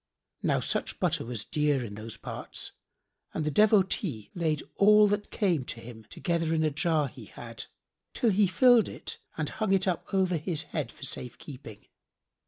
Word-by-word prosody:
Now - - +2
such - - -1
butter - - +1
was 115 -3 -4
dear 145 -4 +1
in 105 - -7
those 110 +2 -8
parts - - -6 0.6
and 155 - -1
the 150 - 0
Devotee 190 - +2
laid 160 -4 0
all 210 +1 +7
that 205 0 -1
came 180 - +1
to 120 - -6
him 115 -1 -11
together 165 - -1
in 160 - +2
a 155 - +2
jar 155 -1 +1
he - - -11
had, - - -9 0.5
till 235 -4 +3
he 200 +1 +4
filled 245 +4 +5
it - - -6 0.2
and - - -1
hung 215 -3 0
it 195 0 +2
up 180 -3 -2
over 185 -3 +2
his 160 0 -1
head 150 0 -4
for - - -13
safe 125 -2 -5
keeping. 125 -7 -11
160 Hz, 180 wpm, -29 LUFS, 135-195 Hz, 0.6 s, all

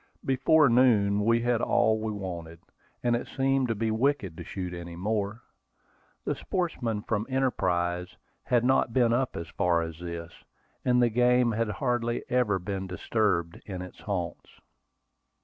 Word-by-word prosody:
Before 135 +3 +4
noon 110 -5 +4
we 115 +2 +3
had 120 -1 +1
all 110 0 +3
we 110 0 -2
wanted, 85 -5 -6 0.4
and 120 -1 +3
it 120 - -3
seemed 135 -1 +1
to 115 - -1
be 110 +1 -1
wicked 110 - 0
to - - -6
shoot 90 -2 -5
any 85 -1 -7
more. 105 +4 -2 0.8
The - - 0
sportsmen 120 - -2
from 110 0 -1
Enterprise 90 -9 0 0.4
had 120 -1 +2
not 130 -2 +2
been 120 -2 +3
up 130 +1 0
as 85 - -5
far 85 -2 +1
as 80 0 -7
this, 85 -1 -6 0.5
and 125 -1 +3
the 120 - +4
game 125 +1 +3
had 115 0 0
hardly 120 -1 -1
ever 120 -6 +2
been 95 +1 -4
disturbed 90 -3 -1
in 95 -3 -5
its 90 - -11
haunts. 90 -5 -4
110 Hz, 155 wpm, -28 LUFS, 90-125 Hz, 0.8 s, Before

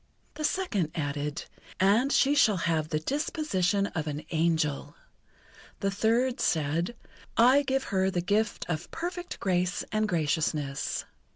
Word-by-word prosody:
The 305 - -6
second 240 - 0
added: 145 -1 -3 0.3
"And 215 +8 +4
she 280 0 +4
shall 220 -9 +4
have 160 -2 0
the 155 - 0
disposition 200 - 0
of 160 -6 -4
an 150 0 -4
angel." 160 -3 0 0.8
The 195 -1 0
third 235 +6 +1
said: 165 +7 0 0.4
"I 255 +5 +6
give 270 -1 0
her 190 -1 +1
the 180 - -1
gift 205 +5 0
of 160 -1 -3
perfect 355 +1 -5
grace 180 -1 0
and 215 0 +1
graciousness." 150 -3 -1
190 Hz, 130 wpm, -28 LUFS, 160-245 Hz, 0.8 s, I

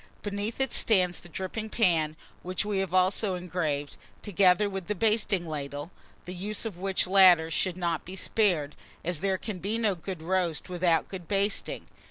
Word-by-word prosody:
Beneath 205 +3 -3
it 265 - 0
stands 185 -6 +3
the 175 - -13
dripping 190 +6 -5
pan, 165 -9 +2 0.3
which 185 +3 -2
we 205 -2 -1
have 190 -3 -2
also 185 +2 +2
engraved, 165 -5 -3 0.3
together 195 0 +3
with 195 -3 -5
the 210 - -1
basting 210 -3 +1
ladle, 145 +1 -5 0.3
the 180 - -6
use 205 +5 -2
of 220 -5 -4
which 195 0 0
latter 180 -4 +6
should 180 +3 -1
not 170 -3 -1
be 185 - -9
spared; 180 -8 +1 0.3
as 175 -2 0
there 190 +1 0
can 200 -1 -6
be 205 +5 -2
no 220 -3 +1
good 175 -1 -7
roast 180 -1 -1
without 175 -2 +1
good 180 -4 -8
basting. 200 +1 0
185 Hz, 175 wpm, -28 LUFS, 170-200 Hz, 0.3 s, latter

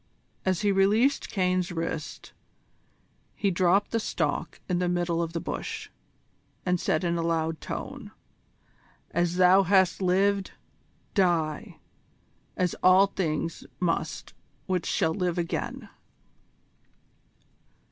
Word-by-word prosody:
As 185 0 +1
he 205 -1 +3
released 210 +8 +3
Caine's 185 -1 0
wrist 160 -2 -5 1.0
he 200 - 0
dropped 185 +3 +2
the 230 - +1
stalk 165 -5 -2
in 180 -2 0
the 180 -1 0
middle 175 -1 0
of 165 -1 -3
the 170 - -1
bush, - - -5 0.7
and 180 -1 +1
said 155 +1 0
in 170 -1 0
a - - 0
loud 165 -1 -1
tone: - - -6 1.0
"As 175 0 0
thou 185 +1 +6
hast 190 0 +3
lived, 195 +2 +2 0.6
die 170 -6 0 0.8
as 180 -2 +1
all 185 +2 +7
things 165 -4 -3 0.2
must 170 -2 -2 0.3
which 185 -3 -1
shall 160 - +1
live 180 -1 -1
again." 170 -1 -3
180 Hz, 115 wpm, -27 LUFS, 165-190 Hz, 1.0 s, all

